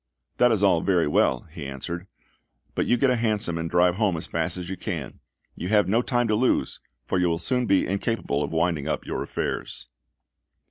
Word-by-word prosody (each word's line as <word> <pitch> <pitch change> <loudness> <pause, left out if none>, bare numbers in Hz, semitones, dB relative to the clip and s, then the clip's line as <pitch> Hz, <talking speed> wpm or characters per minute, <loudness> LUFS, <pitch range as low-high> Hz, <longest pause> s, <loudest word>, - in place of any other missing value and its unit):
"That 125 0 +5
is 105 -3 +1
all 90 -5 +4
very 90 -4 +2
well," 65 -3 +2
he 80 -2 -8
answered, 85 +7 -5 0.7
"but - - -1
you 120 - +3
get 130 +2 +3
a - - +3
hansom 105 -7 0
and 80 0 -3
drive 90 +1 +3
home 105 -6 +1
as 80 - -4
fast 85 +1 -1
as 90 -1 -5
you 95 - -4
can. - - -5 0.4
You 90 - -5
have 105 0 +3
no 110 +5 +3
time 120 -1 +1
to - - +3
lose, 125 +4 +1 0.3
for 95 - 0
you 90 -1 +2
will 85 - 0
soon 125 +8 0
be 95 -1 +3
incapable 100 -6 -1
of 75 - -1
winding 80 -3 0
up - - -2
your - - -3
affairs." - - -4
90 Hz, 205 wpm, -25 LUFS, 85-110 Hz, 0.7 s, That